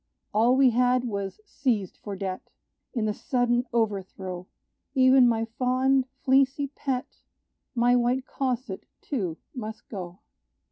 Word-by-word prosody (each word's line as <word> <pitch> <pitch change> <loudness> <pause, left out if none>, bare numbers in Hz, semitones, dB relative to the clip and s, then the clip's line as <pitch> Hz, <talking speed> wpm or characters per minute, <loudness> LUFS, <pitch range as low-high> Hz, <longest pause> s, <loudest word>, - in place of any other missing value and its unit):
All 235 +4 +4
we 265 -2 +6
had 250 +1 +3
was 200 - -4
seized 235 - -1
for 205 -2 -6
debt: 190 -1 -5 0.5
In 225 -3 +1
the 210 - 0
sudden 245 +1 +1
overthrow, 190 -5 -2 0.5
Even 260 -1 +6
my 225 -1 +1
fond, 255 +3 +1 0.2
fleecy 275 +1 +3
pet, 265 -1 -4 0.6
My 245 +1 +4
white 250 +2 +1
cosset, 255 -6 -3
too, 185 - -3 0.2
must 220 -3 -7
go. 180 -4 -6
245 Hz, 125 wpm, -27 LUFS, 205-260 Hz, 0.6 s, we